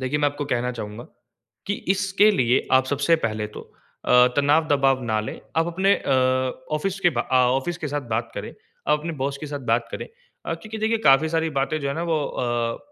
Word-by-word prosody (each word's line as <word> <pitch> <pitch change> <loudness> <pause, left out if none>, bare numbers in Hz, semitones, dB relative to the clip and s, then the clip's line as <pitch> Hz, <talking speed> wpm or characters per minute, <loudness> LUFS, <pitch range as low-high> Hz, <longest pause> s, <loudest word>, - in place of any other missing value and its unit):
देखिए 130 +3 -1
मैं 145 - +2
आपको 145 0 -5
कहना 125 0 0
चाहूँगा 110 0 -7 0.6
कि 205 - 0 0.2
इसके 195 +2 +3
लिए 125 - +2
आप 130 0 +5
सबसे 145 +4 +2
पहले 110 -1 -3
तो - - -5 0.4
अ, - - -2 0.3
तनाव 145 +3 +3
दबाव 135 -2 +2
ना 110 -2 0
लें 110 - -6 0.2
आप 165 0 +3
अपने 190 +4 +2
अ, - - -4 0.7
ऑफ़िस 195 +5 -3
के 175 -2 +4
बा - - +3
अ, 130 - -3 0.2
ऑफ़िस 135 +6 -2
के 150 - -4
साथ 145 +1 -3
बात 115 +1 -1
करें, - - -6 0.3
आप 150 0 +4
अपने 165 +2 -4
बॉस 140 0 -1
के 155 - -5
साथ 145 -1 -5
बात 115 0 +1
करें। - - -5 0.4
अ, - - -1
क्योंकि 220 0 -8
देखिए 220 +1 +1
काफ़ी 150 -3 +4
सारी 160 0 0
बातें 155 +3 -1
जो 140 - -2
है 140 - -2
ना 165 - -3
वो 155 - +1
अ, 120 -1 -2
145 Hz, 220 wpm, -23 LUFS, 125-165 Hz, 0.7 s, आप